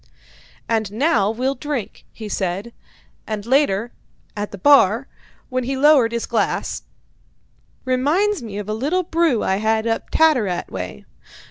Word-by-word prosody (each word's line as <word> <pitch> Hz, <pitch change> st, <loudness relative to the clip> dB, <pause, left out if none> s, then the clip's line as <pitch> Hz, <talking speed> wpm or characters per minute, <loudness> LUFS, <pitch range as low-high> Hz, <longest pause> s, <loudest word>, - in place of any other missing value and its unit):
"And 220 Hz, -3 st, 0 dB
now 225 Hz, -5 st, +2 dB
we'll 255 Hz, +5 st, -1 dB
drink," 285 Hz, -6 st, -5 dB
he 220 Hz, -, -8 dB
said; 195 Hz, +3 st, -3 dB, 0.5 s
and 215 Hz, -2 st, -4 dB
later, 240 Hz, -4 st, +2 dB, 0.4 s
at 205 Hz, 0 st, -3 dB
the 200 Hz, -, -7 dB
bar, 250 Hz, +1 st, +4 dB, 0.4 s
when 255 Hz, -1 st, -1 dB
he 265 Hz, +2 st, -2 dB
lowered 275 Hz, -5 st, +5 dB
his 235 Hz, -1 st, -2 dB
glass: -, -, -1 dB, 1.0 s
"Reminds 295 Hz, +10 st, +1 dB
me 215 Hz, -4 st, -7 dB
of 205 Hz, -1 st, -5 dB
a 215 Hz, -, -2 dB
little 295 Hz, +12 st, 0 dB
brew 325 Hz, -8 st, +1 dB
I 190 Hz, -, +1 dB
had 220 Hz, +1 st, +1 dB
up 225 Hz, -1 st, -2 dB
Tattarat 245 Hz, -, +2 dB
way. 90 Hz, -7 st, -6 dB
230 Hz, 140 wpm, -21 LUFS, 210-280 Hz, 1.0 s, lowered